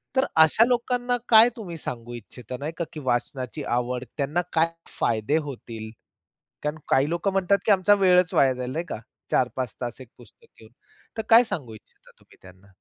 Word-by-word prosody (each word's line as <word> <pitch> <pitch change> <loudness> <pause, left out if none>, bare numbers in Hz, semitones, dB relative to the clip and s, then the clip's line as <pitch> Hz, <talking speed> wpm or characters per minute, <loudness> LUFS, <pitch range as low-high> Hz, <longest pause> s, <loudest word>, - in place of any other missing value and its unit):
तर 265 +1 +3 0.2
अशा 160 +8 +4
लोकांना 245 0 0
काय 225 +1 +8
तुम्ही 180 -7 -7
सांगू 120 -5 -7
इच्छिता 120 +1 -9
नाही 145 +3 -4
का, 170 - -1
की 155 - -6
वाचनाची 130 +1 -3
आवड 125 0 -2
त्यांना 145 +5 0
काय 165 0 +3 0.3
फायदे 115 +6 +1
होतील 115 -4 -8 0.7
कारण 150 +1 -3
काही 135 +2 +3
लोक 170 +4 -1
म्हणतात 195 0 +2
की 215 - +6
आमचा 200 +1 +4
वेळच 180 -3 +3
वाया 135 -1 +4
जाईल 125 0 -5
नाही 165 +5 -3
का? - - -4 0.3
4-5 125 -1 -1
तास 120 0 -5
एक 130 - -11
पुस्तक 120 - -19
घेऊन. 110 +1 -17 0.5
तर - - 0
काय 230 +2 +8
सांगू 150 - -5
इच्छिता 110 - -19
तुम्ही - - -23
त्यांना? 95 +1 -17
145 Hz, 180 wpm, -25 LUFS, 125-195 Hz, 0.7 s, काय